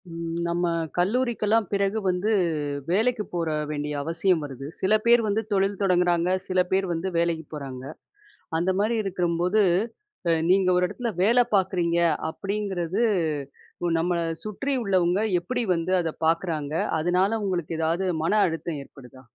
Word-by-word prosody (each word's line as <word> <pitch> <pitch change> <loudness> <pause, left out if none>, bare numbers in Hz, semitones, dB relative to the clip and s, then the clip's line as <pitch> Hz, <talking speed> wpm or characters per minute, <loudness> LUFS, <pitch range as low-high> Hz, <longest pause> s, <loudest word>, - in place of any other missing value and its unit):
ம் 165 0 -5
நம்ம 175 +1 0 0.3
கல்லூரிக்கெல்லாம் 220 +1 +1
பிறகு 200 +1 +1
வந்து 185 +4 +1 0.6
வேலைக்கு 220 +3 +2
போக 170 -2 -1 0.2
வேண்டிய 150 0 -3
அவசியம் 165 +2 +1
வருது. 135 -1 -8
சில 190 +3 +2
பேர் 235 0 +6
வந்து 210 +1 +1
தொழில் 195 0 +1
தொடங்குறாங்க. 175 -2 +2 0.2
சில 185 0 +1
பேர் 190 +1 +2
வந்து 165 +3 -3
வேலைக்கு 170 -2 0
போறாங்க. 135 -3 -7 0.8
அந்த 175 +3 0
மாரி 220 +3 +1
இருக்கும்போது, 180 +1 +1 0.7
அ - - +5 0.2
நீங்க 185 0 +4
ஒரு 180 - +3
எடத்துல 230 +4 -4
வேல 240 +4 +5
பாக்குறீங்க 180 -3 +1 0.3
அப்டிங்கிறது, 195 +1 -2 1.0
நம்மள 175 +1 0 0.3
சுற்றி 275 +7 -2
உள்ளவங்க 185 -2 +2 0.2
எப்படி 245 +8 -2
வந்து 165 +2 -2
அத 165 - -2 0.2
பாக்குறாங்க? 160 -3 -1 0.3
அதனால 185 +6 +2
உங்களுக்கு 175 -4 -2
ஏதாவது 165 +4 0 0.2
மன 165 - +1
அழுத்தம் 165 -2 -4
ஏற்படுதா? 130 -2 -15
180 Hz, 135 wpm, -25 LUFS, 165-200 Hz, 1.0 s, பேர்